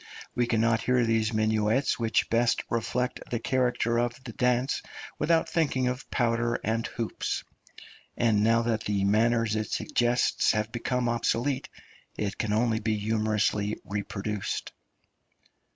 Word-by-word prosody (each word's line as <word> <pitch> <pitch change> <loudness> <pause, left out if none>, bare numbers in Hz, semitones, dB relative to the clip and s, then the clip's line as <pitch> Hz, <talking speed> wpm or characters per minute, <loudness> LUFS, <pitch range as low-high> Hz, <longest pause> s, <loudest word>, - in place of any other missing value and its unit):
We 120 -1 +1
cannot 115 -1 +2
hear 125 -1 +2
those 115 -1 +1
minuets 110 +4 +1
which 115 -1 +1
best 115 +1 +2
reflect 125 +2 -1
the 120 - -1
character 120 -1 +1
of 120 0 0
the 115 - -8
dance 125 +2 +1 0.4
without 165 +1 +2
thinking 140 -6 +1
of 125 +2 -4
powder 120 -1 +1
and 115 +1 -1
hoops; 115 -2 -3 0.7
and 110 -3 +3
now 115 +1 +3
that 115 -2 -1
the 100 -2 0
manners 110 +2 +2
it 110 0 -2
suggests 120 +1 +1
have 110 0 -1
become 125 +1 -1
obsolete, 120 +3 0 0.5
it 105 -1 -3
can 110 - -1
only 110 +1 +2
be 110 0 0
humorously 105 -1 0
reproduced. 100 0 -3
115 Hz, 135 wpm, -28 LUFS, 110-120 Hz, 0.7 s, and